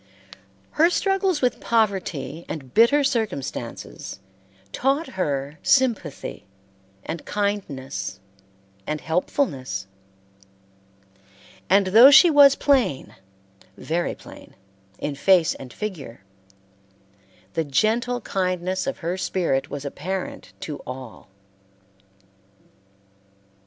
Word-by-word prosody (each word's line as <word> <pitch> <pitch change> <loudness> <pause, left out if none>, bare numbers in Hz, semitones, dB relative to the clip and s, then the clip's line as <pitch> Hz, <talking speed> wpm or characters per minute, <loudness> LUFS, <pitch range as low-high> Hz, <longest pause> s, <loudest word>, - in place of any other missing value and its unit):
Her 325 +3 +4
struggles 385 -4 0
with 250 - +1
poverty 190 -8 -1
and 135 -5 -7
bitter 280 +6 +5
circumstances 205 - -4 0.5
taught 275 +5 0
her 145 -4 -3
sympathy 230 - 0 0.6
and 165 -1 -5
kindness 135 - -3 0.7
and 150 0 -2
helpfulness; 160 - -2 1.8
and 195 +2 +5
though 225 +8 +8
she 325 +4 +8
was 285 -2 +7
plain, 265 - +1 0.6
very 170 +2 -2
plain, - - -14 0.4
in 145 - -3
face 175 +3 +3
and 130 -2 -10
figure, 165 - -7 1.3
the 165 - 0
gentle 225 - 0
kindness 185 0 -2
of 275 - -2
her 175 +2 -1
spirit 170 -9 -1
was 145 0 -6
apparent 185 +7 -5
to 150 - -6
all. 130 -5 -9
185 Hz, 90 wpm, -23 LUFS, -, 1.8 s, though